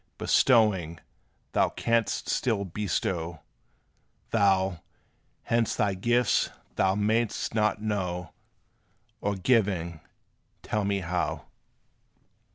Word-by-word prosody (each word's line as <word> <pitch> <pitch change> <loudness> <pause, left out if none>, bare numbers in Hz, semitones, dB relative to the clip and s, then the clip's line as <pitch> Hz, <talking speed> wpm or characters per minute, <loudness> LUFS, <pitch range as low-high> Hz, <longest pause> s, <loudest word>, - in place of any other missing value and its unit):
Bestowing, 100 - +3 0.5
thou - - +2
canst 115 -2 0
still 110 -5 0
bestow; 85 -3 -2 0.9
Though, 95 -3 +2 0.7
whence 115 -2 +1
thy 100 -2 +1
gifts 120 +5 +2 0.3
thou 95 0 +2
may'st 110 +2 0
not 105 -1 +1
know, 90 -5 -2 0.9
Or 100 0 0
giving, 95 -6 +1 0.6
tell 105 -1 -1
me 100 -1 0
how. 90 +1 -2
100 Hz, 85 wpm, -27 LUFS, 90-110 Hz, 0.9 s, Bestowing